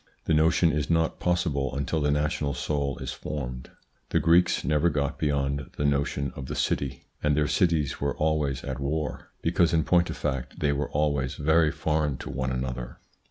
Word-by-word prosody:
The - - +2
notion 80 +2 +4
is 75 0 -1
not 80 -1 +1
possible 70 -7 0
until 70 +3 -1
the 75 - +2
national 75 -1 0
soul 70 -2 -1
is - - -5
formed. 65 -4 -5 0.4
The - - +2
Greeks 85 +2 +4
never 75 +2 +2
got 70 -2 -1
beyond 70 -2 0
the 75 - 0
notion 70 -1 0
of 65 -1 -6
the - - -4
city, 65 -2 -1 0.2
and 75 -1 +2
their 75 - +3
cities 80 -7 +1
were 70 0 -1
always 75 -4 0
at 65 -2 -4
war, 75 +2 -3
because 85 -1 +2
in 80 -1 +3
point 85 +1 +3
of - - -5
fact 65 -2 -3
they 75 -1 +2
were 70 0 -2
always 70 -3 0
very 80 +1 +3
foreign 75 -4 0
to - - -7
one 65 0 -2
another. 65 -1 -4
75 Hz, 185 wpm, -27 LUFS, 70-80 Hz, 0.4 s, notion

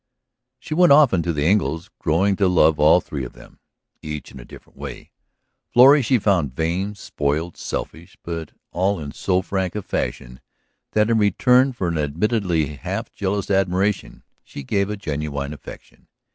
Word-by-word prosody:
She 155 - -7
went 175 -1 +5
often 140 - +6
to 85 - -1
the 75 -2 -1
Engles', 85 -2 0
growing 95 +5 +1
to 100 - +3
love 80 -4 +3
all 80 +4 +5
three 70 -4 -6
of 60 - -8
them, - - -17 0.4
each 75 -1 -7
in 65 - -11
a - - -10
different - - -16
way. - - -8 0.6
Florrie 135 +4 +7
she 125 +1 +2
found 90 - 0
vain, 90 +7 -2
spoiled, 80 -2 -3
selfish, - - -6
but 85 -2 -5 0.2
all 95 +2 0
in 75 -2 -6
so 95 +3 0
frank 95 -2 -2
a 105 - -3
fashion 60 -6 -4 0.5
that 105 +1 +2
in 115 - +3
return 125 +5 +3
for 110 -8 -3
an 85 -2 -1
admittedly 80 - -1
half - - -5
jealous 100 0 -2
admiration 95 +1 0 0.2
she 70 - -9
gave 100 +8 0
a 105 - -4
genuine 75 -4 -4
affection. 75 - -13
90 Hz, 165 wpm, -21 LUFS, 75-105 Hz, 0.6 s, Florrie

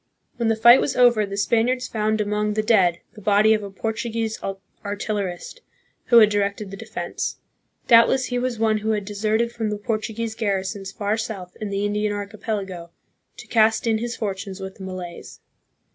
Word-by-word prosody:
When 235 - 0
the 225 - +3
fight 235 +3 +7
was 275 - -1
over 240 -4 +4
the 200 0 -5
Spaniards 240 +4 +1
found 215 0 0
among 210 0 -1
the 215 - +1
dead 185 -6 +3
the 210 - -13
body 210 +2 +4
of 215 - 0
a 200 - -6
Portuguese 225 +2 -3 0.4
artillerist, 205 - -4 0.4
who 235 - +5
had 215 -2 +8
directed 200 0 -1
the - - -6
defense. 220 +2 -5 0.5
Doubtless 245 +2 +5
he 245 -1 -2
was 250 -1 -2
one 220 -1 +2
who 220 +1 0
had 205 -2 -2
deserted 215 +3 0
from 225 -2 -3
the 210 - -2
Portu 215 +1 -3
guese 230 -1 -3
garrisons 195 -2 -2
far 205 +1 -1
south 205 -5 -6
in 210 - -3
the 200 +1 -1
Indian 210 0 0
archipelago 200 -4 -5 0.5
to - - -10
cast 220 -1 +3
in 225 -1 +2
his 235 +1 -3
fortunes 195 -2 -4
with 190 0 -7
the 195 - -9
Malays. 185 -2 -8
215 Hz, 180 wpm, -23 LUFS, 200-225 Hz, 0.5 s, had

